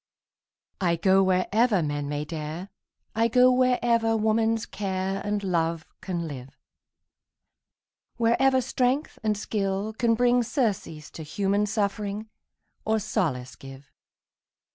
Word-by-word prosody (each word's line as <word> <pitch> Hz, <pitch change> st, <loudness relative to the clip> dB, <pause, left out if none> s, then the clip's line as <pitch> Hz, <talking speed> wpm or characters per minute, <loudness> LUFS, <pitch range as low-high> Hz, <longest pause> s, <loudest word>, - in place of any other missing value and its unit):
I 175 Hz, -2 st, +2 dB
go 190 Hz, +3 st, +4 dB
wherever 195 Hz, +2 st, +2 dB
men 145 Hz, -1 st, -3 dB
may 145 Hz, 0 st, -3 dB
dare, 160 Hz, +4 st, -6 dB, 0.4 s
I 225 Hz, +1 st, +2 dB
go 250 Hz, +2 st, +5 dB
wherever 240 Hz, -3 st, +2 dB
woman's 220 Hz, +1 st, +1 dB
care 190 Hz, -2 st, -3 dB
And 205 Hz, 0 st, -2 dB
love 165 Hz, -3 st, 0 dB, 0.2 s
can 175 Hz, -3 st, -3 dB
live, 135 Hz, -3 st, -9 dB, 1.6 s
Wherever 260 Hz, +3 st, +3 dB
strength 260 Hz, +3 st, -1 dB
and 215 Hz, -1 st, 0 dB
skill 200 Hz, 0 st, -2 dB
can 230 Hz, 0 st, +2 dB
bring 245 Hz, +1 st, +3 dB
Surcease 210 Hz, -, -2 dB
to -, -, -9 dB
human 200 Hz, +6 st, 0 dB
suffering, 210 Hz, 0 st, -2 dB, 0.5 s
Or 220 Hz, 0 st, +1 dB
solace 125 Hz, -, -2 dB
give. 135 Hz, +2 st, -13 dB
205 Hz, 115 wpm, -26 LUFS, 170-230 Hz, 1.6 s, go